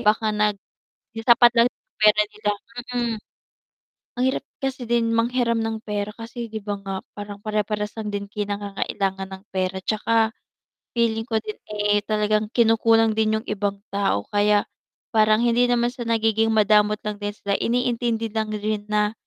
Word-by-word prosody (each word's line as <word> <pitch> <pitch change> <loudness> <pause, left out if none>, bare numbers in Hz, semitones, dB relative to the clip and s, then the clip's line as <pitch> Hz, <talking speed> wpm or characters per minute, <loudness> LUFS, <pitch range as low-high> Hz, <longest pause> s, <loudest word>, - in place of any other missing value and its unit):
Baka 215 +1 +2
nag 210 -1 +1 0.6
yung 225 - -6
sapat 240 0 +7
lang 235 +1 +6
yung - - -62
pera 210 0 +6
nila, 210 -1 -2 0.5
mm. 235 -2 0 1.0
Ang 250 - +1
hirap 265 - -2 0.2
kasi 270 -2 -3
din 235 -1 +2
manghiram 235 0 +1
ng 225 0 -2
pera 210 0 -3
kasi 235 +1 -6
'di 220 0 -5
ba 205 -1 -2
nga 195 0 -5 0.2
parang 205 -1 -7
pare-parehas 210 -1 -1
lang 210 -1 -4
din 200 0 -4
kayong 205 0 -3
nangangailangan 195 -1 -2
ng 190 +1 -9
pera 190 0 -1
tsaka 220 +1 +2 0.7
feeling 225 -1 +1
ko 225 - +1
din, 215 -1 -6 0.2
eh, 205 0 +2
talagang 215 0 +1
kinukulang 225 -1 +4
din 220 0 +2
yung 225 - -18
ibang 200 -1 -2
tao 195 - 0
kaya 205 0 +3 0.5
parang 215 0 +5
hindi 240 +1 +4
naman 240 0 +2
sa 245 -1 -6
nagiging 225 -1 +2
madamot 210 0 +4
lang 210 -1 -2
din 205 0 -2
sila, 200 -1 -1
iniintindi 235 -1 0
lang 220 -1 -1
din 210 0 -2
na 210 0 +2
215 Hz, 165 wpm, -23 LUFS, 205-230 Hz, 1.0 s, sapat